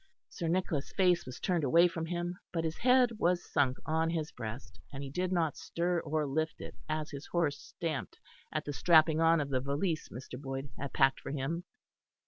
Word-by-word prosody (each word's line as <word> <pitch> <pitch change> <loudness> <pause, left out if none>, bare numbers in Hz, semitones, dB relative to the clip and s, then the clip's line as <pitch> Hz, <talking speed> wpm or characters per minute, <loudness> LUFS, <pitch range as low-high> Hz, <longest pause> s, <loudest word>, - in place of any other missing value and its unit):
Sir 170 - -4
Nicholas' 165 -4 0
face 180 -5 +3
was 130 - -7
turned 175 -4 0
away 170 +6 +6
from 165 -1 -4
him; 175 +1 -3
but 165 -2 -1
his 160 -1 -2
head 250 -1 +5
was 175 0 +2
sunk 135 -3 +2
on 160 +1 +1
his 160 -2 -2
breast, 115 +1 -7
and 135 0 -6
he 135 - -6
did 180 +4 -1
not 165 -4 +1
stir 175 +1 -1
or 155 -1 -1
lift 155 +3 -1
it - - -7 0.2
as 155 0 -2
his 140 0 -7
horse 160 -5 0
stamped 160 -5 -4 0.3
at - - -2
the 145 - -3
strapping 160 0 +5
on 165 0 +5
of 145 -1 -2
the 130 -1 +1
valise 150 +5 -1
Mr. 125 +1 -8
Boyd 135 -1 -5
had 140 -1 -5
packed 135 -1 +3
for - - -7
him. 150 +5 -2
160 Hz, 200 wpm, -32 LUFS, 140-170 Hz, 0.3 s, away